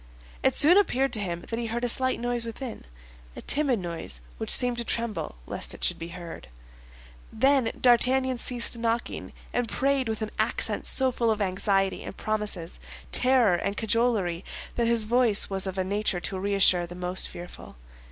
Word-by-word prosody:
It -, -, +2 dB
soon 340 Hz, +6 st, +7 dB
appeared 270 Hz, -9 st, 0 dB
to 215 Hz, -, +2 dB
him 175 Hz, -4 st, -4 dB
that 230 Hz, -, -3 dB
he 235 Hz, -, -3 dB
heard 235 Hz, +2 st, -4 dB
a -, -, +1 dB
slight 260 Hz, +2 st, +2 dB
noise 240 Hz, 0 st, -2 dB
within—a -, -, -10 dB
timid 280 Hz, -4 st, +1 dB
noise 170 Hz, -, -5 dB, 0.2 s
which -, -, -4 dB
seemed 245 Hz, -1 st, +6 dB
to -, -, -2 dB
tremble 230 Hz, -, -1 dB
lest -, -, -3 dB
it -, -, -11 dB
should -, -, 0 dB
be 165 Hz, -, -6 dB
heard. 170 Hz, -, -9 dB, 0.8 s
Then 265 Hz, 0 st, +2 dB
D'Artagnan 255 Hz, +1 st, +3 dB
ceased 240 Hz, -1 st, -1 dB
knocking, 230 Hz, +1 st, -3 dB, 0.2 s
and 245 Hz, -2 st, -1 dB
prayed 270 Hz, -2 st, 0 dB
with 220 Hz, 0 st, -3 dB
an 215 Hz, -, -5 dB
accent -, -, 0 dB
so 265 Hz, -1 st, +4 dB
full 235 Hz, -2 st, 0 dB
of 220 Hz, -1 st, 0 dB
anxiety 195 Hz, 0 st, 0 dB
and -, -, -9 dB
promises, 210 Hz, -, -4 dB, 0.3 s
terror 250 Hz, -6 st, +4 dB
and 200 Hz, +3 st, -2 dB
cajolery, 215 Hz, -6 st, 0 dB, 0.3 s
that 235 Hz, -1 st, 0 dB
his 235 Hz, -1 st, +3 dB
voice 225 Hz, -2 st, +3 dB
was 195 Hz, 0 st, -1 dB
of 190 Hz, 0 st, -5 dB
a 190 Hz, -, 0 dB
nature 200 Hz, -1 st, -1 dB
to 190 Hz, +1 st, -4 dB
reassure 190 Hz, -3 st, +3 dB
the 175 Hz, -, -10 dB
most 180 Hz, +1 st, +2 dB
fearful. 175 Hz, +1 st, -11 dB
220 Hz, 175 wpm, -26 LUFS, 185-245 Hz, 0.8 s, soon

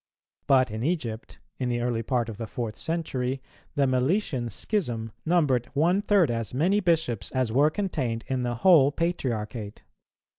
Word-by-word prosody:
But 130 Hz, -4 st, +4 dB
in 110 Hz, +1 st, -4 dB
Egypt, 125 Hz, -9 st, -3 dB, 0.2 s
in 125 Hz, -2 st, -1 dB
the 120 Hz, -1 st, 0 dB
early 120 Hz, -1 st, -1 dB
part 120 Hz, 0 st, 0 dB
of 110 Hz, -3 st, -7 dB
the 115 Hz, -1 st, -5 dB
fourth 110 Hz, -1 st, -4 dB
century, 135 Hz, -6 st, -2 dB, 0.4 s
the 140 Hz, -, +3 dB
Meletian 130 Hz, -, 0 dB
schism 120 Hz, -, -2 dB, 0.2 s
numbered 145 Hz, -8 st, +2 dB
one 175 Hz, +7 st, +3 dB
third 195 Hz, -9 st, +3 dB
as 115 Hz, 0 st, -3 dB
many 180 Hz, +9 st, +3 dB
bishops 160 Hz, -, 0 dB
as 130 Hz, -3 st, 0 dB
were 140 Hz, +6 st, +4 dB
contained 145 Hz, -, -2 dB
in 130 Hz, -1 st, -2 dB
the 120 Hz, -1 st, -1 dB
whole 145 Hz, 0 st, +6 dB
Patriarchate. 120 Hz, -, -3 dB
130 Hz, 155 wpm, -26 LUFS, 115-165 Hz, 0.4 s, whole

